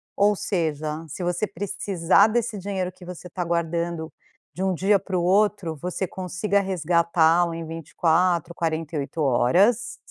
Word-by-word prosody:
ou 205 +1 +3
seja, 155 -5 -2
se 180 - -6
você 175 +4 -1
precisar 195 0 +2
desse 230 0 -1
dinheiro 190 -1 -3
que 180 - -17
você 180 0 -9
está 180 0 -4
guardando, 170 -1 -2 0.4
de 180 - -7
um 190 -1 +1
dia 195 +3 +3
para 185 -2 -3
o 175 - 0
outro 195 -2 +2
você 180 +5 -3
consiga 190 +3 -1
resgatá-lo 170 -2 +2
em 165 0 -5
24, 165 +2 0
48 160 -1 -3
horas, 175 - +2
175 Hz, 140 wpm, -24 LUFS, 165-195 Hz, 0.4 s, ou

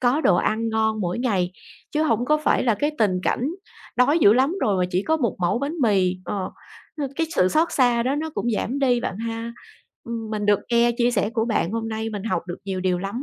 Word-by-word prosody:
có 255 +5 +2
đồ 175 - +4
ăn 225 +4 0
ngon 220 -1 0
mỗi 180 +2 -2
ngày, 200 -8 0 0.4
chứ 305 0 +1
hổng 240 -6 +1
có 305 +3 +3
phải 305 - +1
là 235 -4 +2
cái 290 +7 0
tình 200 -5 +2
cảnh 250 - 0 0.5
đói 280 +6 +4
dữ 210 -10 +6
lắm 265 +7 +2
rồi 205 -3 +2
mà 180 - +2
chỉ 180 +1 0
có 320 +8 +1
một 240 -9 -1
mẩu 180 +5 +1
bánh 285 +4 -3
mì. 190 -5 +2
Ờ, 195 -2 -3 0.5
ờ, 280 - -1
cái 325 - +1
sự 185 - +4
xót 320 - +2
xa 245 -3 +3
đó 260 +3 0
nó 315 +2 -3
cũng 225 +4 -1
giảm 255 +7 -2
đi 250 -3 +2
bạn 195 - -4
ha. 230 +1 -4 0.5
Ừm, 230 -2 -5
mình 210 -1 -2
được 205 -1 +4
nghe 235 0 +4
chia 240 0 +3
sẻ 205 -2 0
của 225 -2 0
bạn 205 -7 0
hôm 225 0 -2
nay, 220 0 -3
mình 205 -2 -5
học 185 -6 -1
được 175 - -6
nhiều 190 -2 -3
điều 185 -1 +1
lắm 200 +8 -4
225 Hz, 245 wpm, -23 LUFS, 200-250 Hz, 0.5 s, dữ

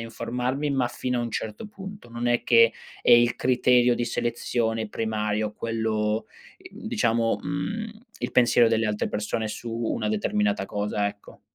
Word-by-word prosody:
informarmi, 125 +5 -2
ma 125 -3 +1
fino 125 0 -2
a - - -1
un 115 - -3
certo 110 - -5
punto. 195 - -10
Non 120 +1 -4
è 120 0 +2
che 115 -1 +5 0.3
è - - +4
il 120 0 +5
criterio 125 -1 +3
di 120 - -1
selezione 115 -1 -1
primario 105 -1 -1
quello, 110 -1 -1 0.4
diciamo, 115 -1 0
mhmm, 215 +10 -3 0.3
il - - -4
pensiero 120 -1 +5
delle 115 0 +2
altre 105 -1 -1
persone 110 +1 -2
su 115 +2 -6
una 115 - -1
determinata 210 -1 0
cosa, 105 0 -1
ecco. 100 0 -8
115 Hz, 150 wpm, -25 LUFS, 110-125 Hz, 0.4 s, che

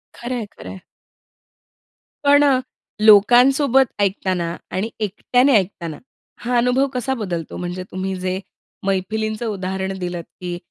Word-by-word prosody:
खरंय, 240 -2 -4
खरंय. 190 - -9 1.4
पण 285 0 +6 0.6
लोकांसोबत 250 +6 +6
ऐकताना 185 -3 0 0.2
आणि 200 +5 -2
एकट्याने 245 +6 +2
ऐकताना, 175 -5 -3 0.4
हा 245 0 0
अनुभव 250 +3 +3
कसा 250 +1 -1
बदलतो. 180 - -4
म्हणजे 180 +1 -4
तुम्ही 190 +1 -3
जे 185 0 -2 0.5
मैफिलींचं 215 +4 -1
उदाहरण 190 -1 -3
दिलत, 175 -1 -4 0.2
की 175 -1 -4
200 Hz, 105 wpm, -20 LUFS, 185-245 Hz, 1.4 s, पण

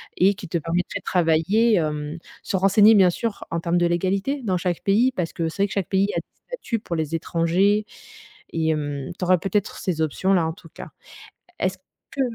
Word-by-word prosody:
et 195 +3 +3
qui 185 - -9
te 170 - -1
permettrait 165 +2 -2
de - - -58
travailler, 180 +7 +2
hem, 150 -2 -2 0.2
se - - -3
renseigner, 205 +3 +6
bien 190 -3 +6
sûr, 215 +4 -3
en 165 - -1
termes 170 +1 0
de 175 - +3
légalité 195 - -1
dans 190 -5 0
chaque 175 -1 -2
pays, 225 +6 +3
parce 180 -10 -3
que 165 -1 -2
c'est 195 +5 -1
vrai - - +2
que 195 - -7
chaque 195 -4 -2
pays 195 0 +2
a - - +1
des - - -12 0.2
statuts 480 - -4
pour 175 -5 -5
les 160 -1 -3
étrangers 175 +6 +1 0.7
et 160 -1 0
hem, 145 -3 -2
tu 180 - -1
auras 185 +1 +4
peut-être 195 +3 -2
ces 170 -4 -2
options-là, 175 +3 +1
en 160 - -3
tout 165 -2 -16
cas. - - -10 0.7
Est-ce 185 0 -1 0.3
que 275 0 -2
180 Hz, 210 wpm, -23 LUFS, 165-200 Hz, 0.7 s, renseigner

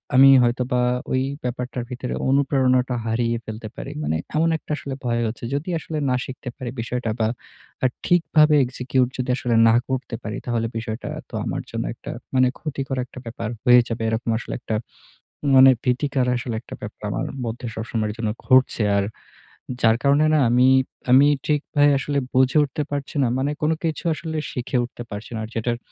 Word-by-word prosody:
আমি 135 +1 +9
হয়তোবা 125 +1 +1 0.3
ওই 130 - +2 0.2
ব্যাপারটার 125 0 -3
ভিতরে 125 0 -4 0.2
অনুপ্রেরণাটা 130 -2 +2
হারিয়ে 115 +1 0
ফেলতে 110 0 -6
পারি। - - -6
মানে 75 +2 0 0.2
এমন 165 +2 +3
একটা 150 - -11
আসলে 135 - -6
ভয় 120 -1 +1
হচ্ছে। 110 +2 -6
যদি 145 +6 -3
আসলে 155 0 -5
না 125 - +2
শিখতে 130 -1 -7
পারি 125 - -5
বিষয়টা 120 0 -3
বা 110 - +2 0.6
আ - - +4 0.2
ঠিকভাবে 155 -3 +4
execute 125 0 0
যদি 125 0 -3
আসলে 120 -2 0
না 115 - +5
করতে 130 -2 -3
পারি, 105 +1 -4
তাহলে 115 -2 0
বিষয়টা 110 0 -5 0.2
তো - - -25
আমার - - -2
জন্য - - -3
একটা - - -8 0.2
মানে 130 0 +5
ক্ষতিকর 135 -3 -4
একটা 130 - -11
ব্যাপার 115 -1 -5
হয়ে 125 -1 +7
যাবে। 115 -1 -4
এরকম 115 +1 -2
আসলে - - -6
একটা 110 - -3 0.8
মানে 130 0 +9
ভীতিকর 130 +1 +1
আসলে 120 -1 -4
একটা - - -10
ব্যাপার 105 0 -8
আমার 130 +8 -2 0.2
মধ্যে 115 +1 -4
সবসময়ের 110 -1 -2
জন্য 115 -2 -2 0.2
ঘুরছে। 130 -3 +4
আর 100 - +2 0.8
যার 115 -1 +5
কারণে 140 +2 +4
না 155 - +4
আমি, 125 +2 +4 0.4
আমি 135 +3 +7 0.2
ঠিকভাবে 145 -1 +2
আসলে 145 +1 -2 0.2
বুঝে 130 +3 +3
উঠতে 145 +1 -2
পারছি 145 +2 -4
না। 125 - +2
মানে 140 +2 0
কোন 155 +1 +2
কিছু 160 -2 -2
আসলে 160 0 -5
শিখে 125 +1 -2
উঠতে 120 0 -7
পারছি 105 +3 -7
না। 110 - -3
আর - - -11
যেটার 120 +1 -1
125 Hz, 180 wpm, -23 LUFS, 115-135 Hz, 0.8 s, আমি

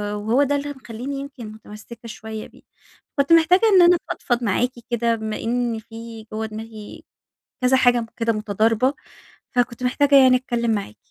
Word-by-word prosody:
وهو 220 +7 +1
ده 285 +1 +1
اللي 285 +1 -3
مخليني 260 +1 -7
يمكن 275 -5 -8
متمسكة 220 +2 -12
شوية 220 0 -7
بيه. - - -20 0.6
كنت 280 +4 +4
محتاجة 335 +3 +5
إن 370 - +8
أنا 350 0 +6
أفضفض 240 -1 -2
معاكِ 235 +4 +1 0.2
كده، 235 -1 +1
بما 220 -1 -4
إن 235 -1 -1
في 225 0 -10
جوا 220 +1 -2
دماغي 220 -1 -10 0.6
كذا 250 +1 +4
حاجة 245 -2 +3
كده 230 -1 +1
متضاربة، 220 +4 +1 0.6
فكنت 245 -1 -1
محتاجة 280 +3 +3
يعني 260 -2 +7
أتكلم 240 -2 -2
معاكِ. 200 - -3
235 Hz, 155 wpm, -22 LUFS, 220-260 Hz, 0.6 s, إن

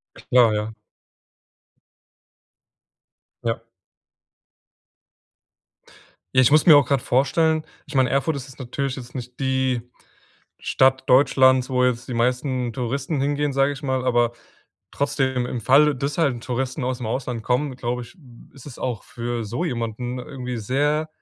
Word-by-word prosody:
Klar, 120 -3 +3
ja. 105 +1 -3 2.7
Ja. 115 0 -2 2.7
Ja, - - +8
ich 125 - +5
muss 155 +1 +4
mir 160 -4 +9
auch 145 - +6
gerade 140 -2 +1
vorstellen 155 +5 +2 0.2
ich 145 - -10
meine, 130 -1 +3
Erfurt 140 +4 +1
ist 140 -1 -6
jetzt 130 - -15
natürlich 135 +1 -3
jetzt 125 -1 -10
nicht 125 -1 -8
die 130 -2 0 0.8
Stadt 130 0 +2
Deutschlands, 130 -1 +4
wo 125 -1 +2
jetzt 125 -1 -1
die 125 - -4
meisten 125 0 0
Touristen 135 +5 -2
hingehen, 145 +1 0
sage 135 +1 +2
ich 140 - -9
mal, 130 -1 -1
aber 120 -2 +2 0.6
trotzdem 135 -3 0
im 120 -1 -4
Falle, 140 +5 +4
das 140 +4 -3
halt 150 -6 +2
’n 120 - -8
Touristen 130 +2 -3
aus’m 125 -1 -3
Ausland 120 0 -3
kommen, 130 +3 0
glaube 125 0 -3
ich, 120 - -14 0.4
ist 135 -1 -15
es 135 - -10
auch 120 -5 -3
für 120 -1 -4
so 120 +11 -3
jemanden 120 -3 -3
irgendwie 125 -2 -6
sehr 145 +7 0
130 Hz, 145 wpm, -23 LUFS, 120-140 Hz, 2.7 s, mir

